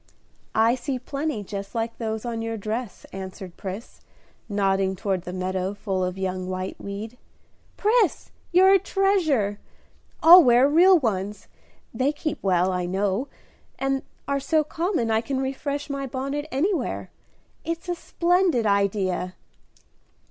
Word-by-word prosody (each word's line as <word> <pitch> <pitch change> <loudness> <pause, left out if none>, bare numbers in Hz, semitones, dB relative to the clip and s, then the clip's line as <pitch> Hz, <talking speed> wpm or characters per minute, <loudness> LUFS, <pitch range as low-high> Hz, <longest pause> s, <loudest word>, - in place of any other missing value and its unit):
"I 225 +2 +4
see 260 +1 -3
plenty 275 -2 -3
just 200 +2 -7
like 230 0 -2
those 220 0 -3
on 230 -1 -3
your 225 0 -3
dress," 220 +2 -4
answered 190 -1 -7
Pris, 195 +5 -7 0.5
nodding 195 -1 +1
toward 190 -2 -2
the 180 - -5
meadow 185 +1 -2
full 195 -2 -2
of 180 +1 -2
young 185 -1 -3
whiteweed. 200 +5 -5 0.6
"Pris, 430 -3 +2 0.2
you're 375 +2 +6
a 390 - +6
treasure! 335 - +1 0.6
I'll 350 +2 +10
wear 245 +1 +5
real 355 +5 +6
ones; 205 - -2 0.5
they 265 +2 +1
keep 305 0 -4
well, 185 -1 +2
I 180 -1 -1
know, 195 +6 0 0.5
and 270 0 0 0.3
are 280 0 0
so 310 +3 +2
common 325 - -1
I 220 0 +3
can 265 +2 -2
refresh 280 +2 -3
my 275 -1 -3
bonnet 275 +3 -3
anywhere. 350 +9 -1 0.5
It's 335 +2 -4
a 355 - 0
splendid 345 -6 +1
idea." 195 -3 0
230 Hz, 135 wpm, -25 LUFS, 195-290 Hz, 0.6 s, I'll